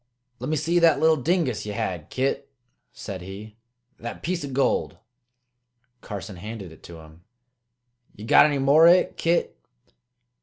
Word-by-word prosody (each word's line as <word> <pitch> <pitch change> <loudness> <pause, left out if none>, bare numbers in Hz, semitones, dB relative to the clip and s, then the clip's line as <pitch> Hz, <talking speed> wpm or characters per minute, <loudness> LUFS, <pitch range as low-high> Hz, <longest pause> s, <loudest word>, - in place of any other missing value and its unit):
"Let - - -5
me 155 - 0
see 165 +4 +1
that 165 -3 +4
little 160 0 +4
dingus 155 - -1
ye 105 - -5
had, 90 -5 -4
Kit," 135 +1 -2 0.4
said 95 -3 -8
he 100 +4 -10 0.4
"that 120 - -8
piece 175 -1 -2
o' 140 - -5
gold." 135 +1 0 1.0
Carson 100 -2 -8
handed 105 -2 -8
it 80 - -16
to 85 -2 -11
him. 80 +2 -17 0.9
"Ye 105 - -10
got 145 - +6
any 145 -2 -1
more 140 +5 +5
o' - - +9
hit, 180 - +1
Kit?" 170 +1 -1
130 Hz, 155 wpm, -24 LUFS, 100-160 Hz, 1.0 s, o